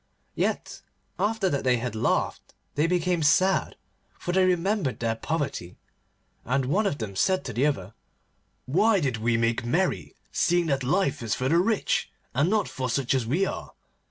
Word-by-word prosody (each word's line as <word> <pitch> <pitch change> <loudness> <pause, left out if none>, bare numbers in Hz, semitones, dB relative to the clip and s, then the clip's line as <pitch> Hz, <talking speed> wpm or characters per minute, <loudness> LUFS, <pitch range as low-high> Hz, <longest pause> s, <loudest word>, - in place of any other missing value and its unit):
Yet, - - -2 0.4
after 205 0 +1
that 140 - -1
they 125 -1 +3
had 120 -1 -3
laughed 110 - -1 0.2
they 150 +3 +2
became 180 0 +1
sad, 185 +5 +3 0.4
for 175 - -3
they 190 +1 +3
remembered 185 -4 0
their 115 -1 0
poverty, 140 - -3 0.7
and 130 +2 0
one 200 +11 +1
of 145 - -1
them 105 -6 -5
said 185 - +1
to - - -4
the 135 +5 +2
other, 100 -8 -3 0.7
'Why 200 +9 +3
did 135 -8 -1
we 115 +1 +1
make 115 0 +1
merry, 170 +10 -1 0.2
seeing 175 0 +2
that 140 -4 0
life 145 0 +1
is 110 -3 -1
for 130 +1 -1
the 165 +3 +4
rich, 215 +3 +1 0.2
and 145 +7 +2
not 215 0 +1
for 130 -2 -4
such 130 +2 0
as 130 -4 0
we 170 +11 +2
are? - - -5
145 Hz, 175 wpm, -26 LUFS, 125-185 Hz, 0.7 s, the